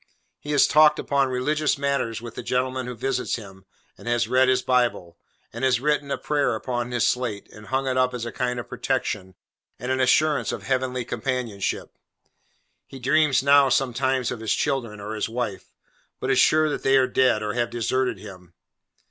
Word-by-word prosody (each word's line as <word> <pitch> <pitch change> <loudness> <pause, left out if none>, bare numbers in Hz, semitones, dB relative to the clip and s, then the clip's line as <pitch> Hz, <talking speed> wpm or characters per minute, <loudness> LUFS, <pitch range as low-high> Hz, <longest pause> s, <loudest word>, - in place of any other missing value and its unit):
He 150 - -6
has 145 - +5
talked 150 -1 +5
upon 140 -1 +1
religious 145 +4 0
matters 140 -5 -1
with 120 -1 -8
the - - -6
gentleman 130 0 -1
who 125 - -5
visits 125 +2 -1
him, 95 -4 -11 0.3
and - - -12
has 120 -1 +1
read 130 +2 +3
his 130 0 +2
Bible, 120 -9 0 0.3
and - - -6
has 130 -2 +3
written 145 +1 0
a - - -1
prayer 145 -1 0
upon 120 -1 -3
his 120 -1 +1
slate, 120 -6 -2
and 105 0 -13
hung 135 +1 -1
it 130 0 0
up 130 0 +3
as 120 -1 -4
a 120 - -5
kind 125 -1 -2
of 120 - -7
protection, 95 0 -3 0.4
and 125 +1 -4
an 130 - 0
assurance 150 +3 +2
of - - -6
Heavenly 130 -2 -1
companionship. 120 -6 -3 0.9
He 135 - -10
dreams 135 0 +2
now, 140 -1 +5
sometimes, 130 -1 0
of 125 - -5
his 110 -2 0
children 115 -6 -2
or 105 +2 -6
his 110 +1 -2
wife, 115 -4 -4 0.5
but 130 - -1
is 130 - +3
sure 155 0 +4
that 150 - -3
they 135 0 +4
are 130 - +4
dead, 125 -3 +2
or 105 0 -2
have 120 -1 -1
deserted 125 +2 -1
him. 90 -3 -13
125 Hz, 190 wpm, -24 LUFS, 115-135 Hz, 0.9 s, has